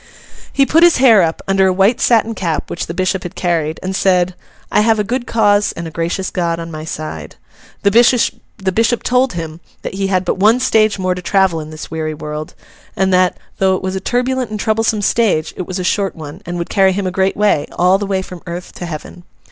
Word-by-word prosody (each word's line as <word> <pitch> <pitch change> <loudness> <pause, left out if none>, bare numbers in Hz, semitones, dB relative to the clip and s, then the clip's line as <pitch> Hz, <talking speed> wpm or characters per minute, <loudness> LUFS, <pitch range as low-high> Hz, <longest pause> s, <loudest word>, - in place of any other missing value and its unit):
He 275 - +3
put 320 +4 +3
his 345 -1 +6
hair 235 -6 +6
up, 165 -1 -1
under 195 0 +3
a - - +3
white 195 +5 +2
satin 230 -1 +3
cap 170 -7 -3
which 170 - -4
the 170 - -5
bishop 185 +1 0
had 175 - -8
carried, 160 -3 -1
and 190 +1 -3
said, 185 -1 +2 0.4
'I - - +4
have 220 +1 +3
a 210 - +1
good 240 +3 -3
cause 210 -2 +2
and 170 0 -6
a - - -8
gracious 170 +4 -2
God 170 -2 -1
on 165 0 -6
my 155 -1 -6
side.' 155 - -6 0.5
The 200 - +4 0.8
bishop 230 +4 +1
told 250 -1 +2
him 165 -2 -6 0.2
that - - -5
he 195 0 -1
had 185 -1 0
but - - -1
one 220 +5 +4
stage 220 -5 +2
more 185 -1 0
to 180 - -6
travel 190 -2 +2
in 155 0 -7
this 155 +1 -9
weary 155 -1 -3
world, 150 0 -6 0.4
and 190 0 +1
that, 185 0 +3 0.2
though 190 -1 +3
it 185 - -5
was 190 0 -2
a - - -1
turbulent 250 +3 -1
and 215 0 -5
troublesome 220 0 0
stage, 195 -8 +1
it 185 - -5
was 185 - -4
a 185 - -3
short 195 +2 0
one, 155 +3 -9
and 175 0 -4
would 170 - -4
carry 190 -1 +4
him 200 +1 -2
a 185 - -1
great 190 +1 0
way—all 185 -1 +2
the 205 - -3
way 190 -1 -1
from 180 -2 -10
earth 175 +1 -6
to 175 - -7
Heaven. 170 +2 -8
190 Hz, 230 wpm, -16 LUFS, 170-210 Hz, 0.8 s, his